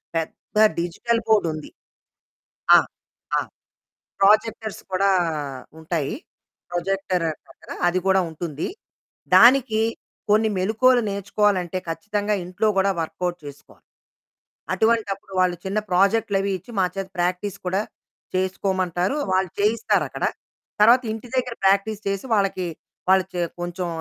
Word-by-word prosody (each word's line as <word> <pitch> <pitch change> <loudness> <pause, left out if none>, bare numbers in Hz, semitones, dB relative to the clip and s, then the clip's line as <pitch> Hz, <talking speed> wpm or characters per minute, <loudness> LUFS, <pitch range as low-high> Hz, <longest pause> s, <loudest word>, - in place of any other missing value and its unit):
పెద్ద 165 +5 -4 0.2
digital 230 +7 -1
board 215 -5 +4
ఉంది. 155 -1 -8 1.1
ఆ! - - +10 0.6
ఆ! - - +3 0.8
ప్రోజెక్టర్స్ 215 +1 +2
కూడా 195 +1 +3 0.7
ఉంటాయి. 160 -2 -2 0.6
ప్రొజెక్టర్ 180 0 -1
దాని 155 - -5
పక్కన - - -12 0.2
అది 180 +1 +1
కూడా 190 0 +4
ఉంటుంది. 160 -2 -4 0.7
దానికి 240 -3 +6 0.5
కొన్ని 220 +1 +4
మెళకువలు 235 +6 +3
నేర్చుకోవాలంటే 200 -2 0
ఖచ్చితంగా 205 +5 -1
ఇంట్లో 185 +5 0
కూడా 195 +1 +3
వర్కౌట్ 175 +2 -3
చేసుకోవాలి. 145 0 -13 0.9
అటువంటప్పుడు 215 -4 0
వాళ్ళు 180 -1 +2
చిన్న 195 +2 -1
ప్రాజెక్టులవి 200 +1 +2
ఇచ్చి 210 - -16
మాచేత 190 +1 -1
ప్రాక్టీస్ 180 +2 -1
కూడా 190 +2 +1 0.5
చేసుకోమంటారు. 185 - 0 0.2
వాళ్ళు 185 -1 +1
చేయిస్తారక్కడ. 220 +2 +1 0.6
తర్వాత 235 +4 +7
ఇంటి 225 +2 -8
దగ్గర 250 -2 -1
ప్రాక్టీస్ 200 +2 +2
చేసి 195 +2 -2
వాళ్ళకి, 195 -3 0 0.4
వాళ్ళు 190 0 +5 0.4
కొంచెం 175 +1 -3
195 Hz, 105 wpm, -23 LUFS, 180-215 Hz, 1.1 s, ఆ